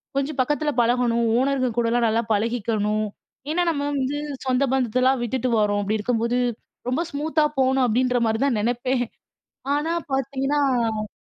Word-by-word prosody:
கொஞ்சம் 275 +1 -1
பக்கத்தில 295 +3 0
பழகணும். 235 0 +2
ஓனருங்க 265 -1 +1
கூடலாம் 235 0 +2
நல்லா 225 +1 +2
பழகிக்கணும். 215 -1 0 0.4
ஏன்னா 350 +3 +1
நம்ம 285 -3 -1
வந்து 275 +1 -1 0.3
சொந்த 260 +1 +2
பந்தத்தலாம் 255 +1 +2
விட்டுட்டு 250 +1 -1
வரோம். 205 -1 +2
அப்பிடி 210 +2 0
இருக்கும்போது 235 +2 0 0.5
ரொம்ப 255 +6 0
ஸ்மூத்தா 305 +2 0
போணும் 265 0 +3
அப்பிடின்றமாரி 235 -1 +1
தான் 265 -5 +1
நினைப்பேன். 245 +2 0 0.7
ஆனா, 305 +3 0 0.2
பார்த்தீங்கன்னா 265 -5 0
250 Hz, 130 wpm, -23 LUFS, 230-270 Hz, 0.7 s, போணும்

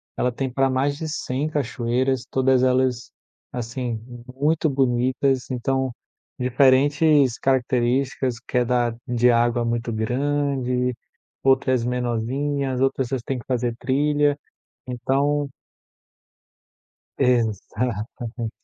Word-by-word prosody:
ela 125 - 0
tem 130 +2 -3
para 135 +1 +2
mais 135 +2 +1
de 160 +2 -5
100 145 -1 -2
cachoeiras, 130 -2 -1
todas 130 -1 +3
elas, 130 -1 +1 0.4
assim, 120 -1 -4 0.4
muito 155 +3 +1
bonitas, 130 0 +1
então, 130 +1 -1 0.5
diferentes 135 +2 +4
características 130 0 +1
que 125 - +1
é 125 - +3
da 120 -1 +1
de 120 0 +3
água 120 0 +2
muito 115 0 -1
grande, 125 +1 0 0.5
outras 130 -2 +3
menorzinhas, 125 +3 -1
outras 135 -1 +1
vocês 130 -1 -2
têm 130 0 -3
que - - -12
fazer 120 -2 0
trilha, 145 +1 +2 0.5
então 140 +4 0 1.7
Exatamente. 120 -1 -1
130 Hz, 105 wpm, -23 LUFS, 120-135 Hz, 1.7 s, diferentes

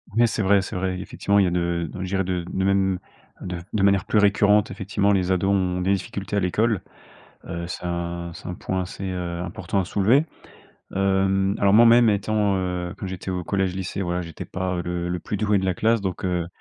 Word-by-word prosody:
Oui, 120 0 +5
c'est 110 - -2
vrai, 100 0 +4
c'est 95 - -6
vrai. 90 0 -2
Effectivement, 100 +2 -1
il - - +5
y 95 - +2
a - - +1
de 85 -2 -1
je 95 - -3
dirais, 95 +1 0
de 90 -1 -2
même 95 -1 +1 0.4
de 90 -1 -4 0.2
de 105 - +1
manière 100 -1 +3
plus 105 - +2
récurrente, 100 0 +4
effectivement, 100 +1 0
les 95 -2 +1
ados 95 +1 +1
ont 90 -2 0
des 95 +2 +2
difficultés 100 +1 -4
à - - +4
l'école. 105 +3 +1 0.7
Heu, 85 0 -4
c'est 90 - -6
un 85 0 -3
c'est - - -10
un 90 - -4
point 95 +1 -2
assez, 90 +2 -7
heu, 90 -2 -4
important 90 +2 -3
à 95 - 0
soulever. 110 - +3 0.7
Hem, 95 0 +2
alors, 100 -1 +3
moi-même, 115 +1 +7
étant, 105 -1 +1
heu, 90 -1 -2
que - - -5
j'étais 95 0 -5
au 90 -1 -2
collège-lycée, 95 +1 -2
voilà, 90 0 -1
j'étais 85 -3 -7
pas, 95 -1 -3
heu, 85 - -2
le 90 0 -3
le 90 0 -2
plus 105 - -4
doué 105 -1 +2
de 95 - -2
la 95 -1 +1
classe, 115 +5 +2
donc 95 -1 -3
heu. 90 -2 0
95 Hz, 215 wpm, -24 LUFS, 90-100 Hz, 0.7 s, moi-même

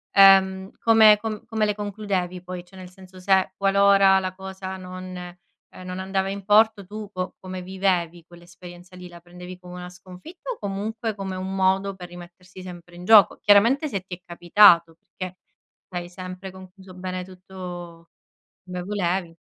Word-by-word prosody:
ehm, 190 -1 +6
come 220 -2 +6
com 220 0 -5
come 220 -2 0
le 210 - -1
concludevi, 200 -4 -3
poi? 180 -1 -7
Cioè, 190 +1 -18
nel 180 -1 -10
senso 185 0 -15
se 190 0 +2
qualora 195 -1 +5
la 185 -1 -4
cosa 190 0 -7
non 185 0 -9
ehm, 180 0 -9 0.5
non 185 +1 -6
andava 190 0 -2
in 200 -1 -6
porto, 210 -1 +4
tu 210 +1 -8
co 185 -1 -5
come 185 -1 -7
vivevi 180 -3 -1
quell'esperienza 175 +1 -14
lì? 180 -1 -10
La 170 0 -13
prendevi 180 +1 -11
come 180 0 -12
una 180 0 -8
sconfitta 185 - -10
o 475 - -6
comunque 215 +3 -4
come 190 -2 -5
un 190 +1 -5
modo 190 +1 +1
per 180 -1 -9
rimettersi 175 +1 -13
sempre 175 -1 -11
in 175 - -10
gioco? 210 +1 +6
Chiaramente 235 +9 +4
se 195 -5 -3
ti 185 -1 -8
è - - -22
capitato, 170 -1 +5
perché 185 +2 -9 0.5
l'hai 175 -1 -5
sempre 185 +1 -8
concluso 190 0 -14
bene 185 0 -5
tutto 180 -2 -10 0.6
come 180 -1 -6
volevi. 180 -3 -2
185 Hz, 165 wpm, -24 LUFS, 180-195 Hz, 0.6 s, ehm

